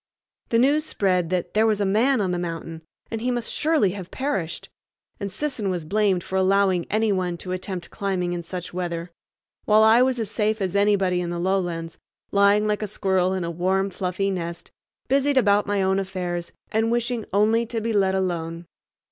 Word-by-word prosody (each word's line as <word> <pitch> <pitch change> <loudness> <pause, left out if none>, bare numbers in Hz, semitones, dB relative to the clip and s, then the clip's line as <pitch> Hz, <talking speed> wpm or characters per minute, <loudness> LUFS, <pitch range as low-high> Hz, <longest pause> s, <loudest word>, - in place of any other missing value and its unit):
The 230 - +2
news 285 +6 +3
spread 185 - 0
that 180 -1 -2
"there 220 +1 +3
was 215 -2 +1
a 200 - +1
man 225 +6 +3
on 185 -2 0
the 175 - -1
mountain," 165 -1 -5 0.3
and 225 -1 -3
he 250 - 0
must 240 -2 -2
surely 300 - +2
have 185 -2 -7
perished, 225 - -3 0.5
and 200 -1 -4
Sisson 220 -3 -2
was 175 -4 -3
blamed 195 0 +1
for 190 - -3
allowing 190 -2 +2
any 220 0 +1
one 180 -3 -1
to 180 - -7
attempt 185 -1 -5
climbing 185 -3 -2
in 175 - -3
such 175 +1 -7
weather; 175 -1 -4 0.5
while 215 +1 +5
I 220 +2 +6
was 255 0 +2
as 215 -2 -3
safe 215 0 0
as 190 -1 -2
anybody 195 -3 +2
in 175 - -3
the 175 - -3
lowlands, 175 -3 -2 0.3
lying 200 +1 +4
like 210 0 0
a 210 - -2
squirrel 190 -2 0
in 185 - -2
a 170 - -3
warm, 190 +3 0
fluffy 185 +2 -1
nest, 170 -2 -5 0.4
busied 275 +1 +2
about 205 -4 +4
my 200 -1 +1
own 190 +1 +2
affairs 180 -3 -4 0.2
and 225 +1 +1
wishing 240 -1 -1
only 220 +3 +3
to 230 0 -3
be 225 +1 -2
let 190 -2 +2
alone. 170 -3 -2
195 Hz, 195 wpm, -24 LUFS, 180-215 Hz, 0.5 s, I